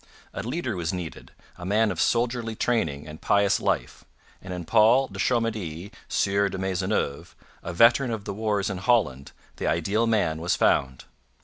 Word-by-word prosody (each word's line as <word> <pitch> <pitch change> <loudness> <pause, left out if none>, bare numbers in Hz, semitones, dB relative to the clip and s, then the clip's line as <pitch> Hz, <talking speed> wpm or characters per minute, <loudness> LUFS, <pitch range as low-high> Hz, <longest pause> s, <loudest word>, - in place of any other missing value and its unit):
A - - -4
leader 120 - -3
was 85 -2 -2
needed, 90 -3 -7 0.3
a - - -8
man 105 +3 +2
of 90 - -2
soldierly 115 -1 0
training 80 -13 -1
and 75 +1 -10
pious 100 -1 +3
life; - - -2 0.4
and 95 - -9
in 90 -2 -5
Paul 120 +9 +4
de - - -10
Chomedy, 105 -7 -1 0.2
Sieur 100 0 +1
de 95 - -5
Maisonneuve, 95 -5 -2 0.3
a - - -5
veteran 120 +8 +4
of 110 -3 -4
the 100 - -4
wars 105 -1 -1
in 95 - -4
Holland, 95 - +1 0.3
the - - -3
ideal 100 +8 +1
man 90 -8 +1
was 90 +1 +1
found. 65 -2 +1
100 Hz, 170 wpm, -25 LUFS, 85-115 Hz, 0.4 s, Paul